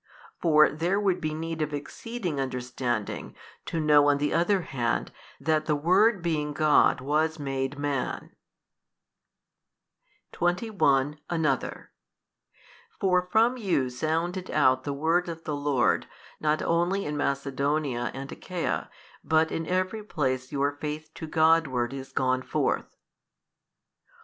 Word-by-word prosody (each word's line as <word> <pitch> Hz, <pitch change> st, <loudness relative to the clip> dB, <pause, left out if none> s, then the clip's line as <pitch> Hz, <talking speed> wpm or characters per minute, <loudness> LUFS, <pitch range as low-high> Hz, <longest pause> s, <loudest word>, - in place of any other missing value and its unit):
for 155 Hz, -2 st, +6 dB
there 175 Hz, +6 st, 0 dB
would 190 Hz, -3 st, +1 dB
be 155 Hz, -, -1 dB
need 160 Hz, +1 st, -4 dB
of 150 Hz, -1 st, -1 dB
exceeding 180 Hz, +2 st, -5 dB
understanding 125 Hz, -4 st, -3 dB, 0.3 s
to 165 Hz, -, -2 dB
know 150 Hz, -2 st, +5 dB
on 145 Hz, -, +3 dB
the 145 Hz, +1 st, 0 dB
other 180 Hz, +3 st, +2 dB
hand 125 Hz, -7 st, -2 dB, 0.3 s
that 155 Hz, +1 st, 0 dB
the 150 Hz, -, +2 dB
Word 185 Hz, +6 st, +3 dB
being 150 Hz, -3 st, -1 dB
God 150 Hz, -3 st, +4 dB
was 155 Hz, +4 st, +1 dB
made 135 Hz, -1 st, -3 dB
Man. 145 Hz, -3 st, -3 dB, 2.0 s
21. 175 Hz, -, +1 dB
Another. 155 Hz, -6 st, -1 dB, 1.1 s
For 180 Hz, -2 st, +2 dB
from 230 Hz, +3 st, +4 dB
you 175 Hz, -, 0 dB
sounded 165 Hz, +7 st, -2 dB
out 130 Hz, 0 st, +3 dB
the 145 Hz, -, -1 dB
word 165 Hz, +5 st, +1 dB
of 165 Hz, -1 st, -7 dB
the 150 Hz, -, -3 dB
Lord 145 Hz, -3 st, +1 dB, 0.3 s
not 155 Hz, 0 st, +1 dB
only 175 Hz, +4 st, +1 dB
in 150 Hz, -, -3 dB
Macedonia 140 Hz, -2 st, -1 dB
and 135 Hz, +1 st, -7 dB
Achaia, 180 Hz, -2 st, -3 dB, 0.3 s
but 160 Hz, 0 st, +2 dB
in 165 Hz, -1 st, -3 dB
every 185 Hz, +4 st, -1 dB
place 130 Hz, -9 st, -2 dB
your 140 Hz, 0 st, +1 dB
faith 155 Hz, +1 st, -5 dB
to 160 Hz, -, -7 dB
Godward 155 Hz, -6 st, +2 dB
is 135 Hz, -1 st, -7 dB
gone 130 Hz, 0 st, +1 dB
forth. -, -, -1 dB
155 Hz, 125 wpm, -27 LUFS, 140-170 Hz, 2.0 s, for